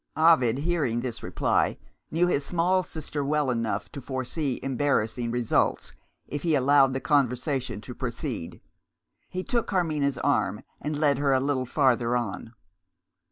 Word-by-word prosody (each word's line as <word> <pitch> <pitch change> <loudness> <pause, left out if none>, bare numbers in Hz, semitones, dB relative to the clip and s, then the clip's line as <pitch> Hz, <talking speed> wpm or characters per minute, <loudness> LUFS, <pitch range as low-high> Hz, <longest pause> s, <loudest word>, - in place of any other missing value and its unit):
Ovid, 155 -7 +5
hearing 145 -7 0
this 120 -2 -5
reply, - - 0 0.3
knew 170 +2 +2
his 145 -5 +1
small 180 +4 +2
sister 155 -4 -5
well 145 -1 +1
enough 115 -4 -2
to 140 - -7
foresee 130 +2 -3
embarrassing 130 -4 0
results 120 -1 0 0.3
if 145 - -4
he 160 -1 +2
allowed 135 0 +4
the 135 - -1
conversation 130 -5 0
to 125 - -8
proceed. 120 - -5 0.7
He 185 0 -4
took 240 -1 -1
Carmina's 155 -7 0
arm, - - 0 0.2
and 150 0 -2
led 145 -3 +3
her 140 -1 +2
a 130 - +4
little 130 -2 -1
farther 125 -3 +2
on. 115 0 -5
140 Hz, 145 wpm, -26 LUFS, 125-150 Hz, 0.7 s, Ovid